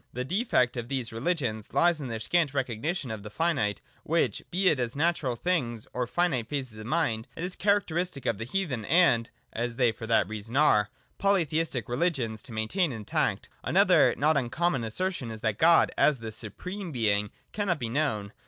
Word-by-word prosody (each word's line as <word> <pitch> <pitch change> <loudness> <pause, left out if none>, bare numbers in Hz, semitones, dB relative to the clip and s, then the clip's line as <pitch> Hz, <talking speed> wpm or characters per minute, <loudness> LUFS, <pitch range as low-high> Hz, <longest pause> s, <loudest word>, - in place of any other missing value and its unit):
The 125 +1 -3
defect 160 - +1
of 120 -1 -4
these 125 -3 -3
religions 115 - -2
lies 175 -2 +3
in 135 - -4
their 115 -2 -4
scant 145 +5 +1
recognition 135 - -2
of 110 -2 -5
the 105 - -8
finite, 135 -5 0 0.2
which, - - 0
be 185 +2 +1
it 155 -7 +4
as 120 0 -2
natural 150 -5 0
things 120 -7 -1
or 125 0 -1
as - - -16
finite 135 -10 0
phases 130 -6 -3
of 110 - -8
mind, 120 -9 0
it 165 - -5
is 180 +1 -3
characteristic 180 - 0
of 105 - 0
the 115 - -3
heathen 135 - -2
and 140 - +4 0.2
(as 120 +1 -2
they 125 -1 +3
also 110 - -5
for 115 - -5
that 110 -5 +3
reason 110 +4 -5
are) 105 -9 +4 0.3
polytheistic 165 - +1
religions 120 -5 -1
to 130 - -12
maintain 115 - 0
intact. 110 -4 -1 0.2
Another - - +4
not 150 +2 +3
uncommon 140 +2 0
assertion 130 - -2
is 110 -1 -7
that 110 -2 -1
God, 170 +1 +5
as 150 -2 +4
the 115 -2 -7
supreme 180 - -4
Being, 105 -5 +1 0.2
cannot 200 -5 0
be 120 -5 -3
known. 115 -6 -1
130 Hz, 190 wpm, -28 LUFS, 115-170 Hz, 0.3 s, God